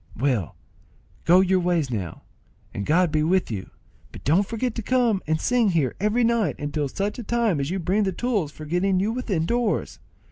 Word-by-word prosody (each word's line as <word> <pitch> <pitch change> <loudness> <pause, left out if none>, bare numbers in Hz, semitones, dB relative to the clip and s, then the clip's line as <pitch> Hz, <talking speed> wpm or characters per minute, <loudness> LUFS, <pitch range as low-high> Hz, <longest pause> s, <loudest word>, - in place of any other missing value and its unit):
"Well, 120 - 0 0.7
go 180 +3 +6
your 190 0 +2
ways 170 -6 0
now, 95 -8 -5 0.5
and 100 - -4
God 170 +2 +3
be 155 -1 +1
with 175 -1 +1
you; 100 -4 -5 0.4
but - - -11
don't 180 +8 +2
forget 230 +2 -2
to 230 - -4
come 235 -4 +1
and 160 0 +1
sing 245 0 +2
here 155 -9 +1
every 210 +5 +1
night 230 -2 +1
until 145 0 -2
such 200 - -3
time 230 -9 +1
as 140 +1 -2
you 190 - -1
bring 190 +4 0
the 195 -2 +1
tools 205 - -1
for 155 - -10
getting 185 +4 +1
you 205 +4 0
within 215 -9 -1
doors. 235 +1 -1
185 Hz, 190 wpm, -24 LUFS, 155-215 Hz, 0.7 s, go